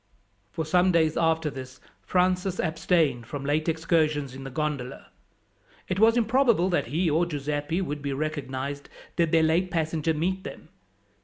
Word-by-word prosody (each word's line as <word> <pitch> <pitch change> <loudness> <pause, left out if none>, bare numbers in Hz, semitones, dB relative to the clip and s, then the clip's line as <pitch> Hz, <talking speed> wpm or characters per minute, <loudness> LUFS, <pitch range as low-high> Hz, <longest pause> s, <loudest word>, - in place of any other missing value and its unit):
For 160 +8 -4
some 180 +4 +3
days 160 -2 +2
after 160 -2 +1
this 130 -1 -9 0.2
Francis 180 0 0
abstained 160 -7 +1
from 140 +2 -6
late 155 +3 +1
excursions 155 -4 0
in 135 +1 -8
the 135 - -6
gondola. 140 -2 -4 0.8
It 185 0 -2
was 225 +2 +5
improbable 230 -5 +3
that 175 - 0
he 165 +8 0
or 160 +2 +2
Giuseppi 150 +2 -2
would 145 -4 -4
be 140 0 -3
recognized 140 -1 -4 0.3
did 170 -2 +1
their 160 -1 +4
late 170 +4 +2
passenger 160 -1 -1
meet 185 +5 -1
them. - - -9
160 Hz, 155 wpm, -26 LUFS, 145-175 Hz, 0.8 s, was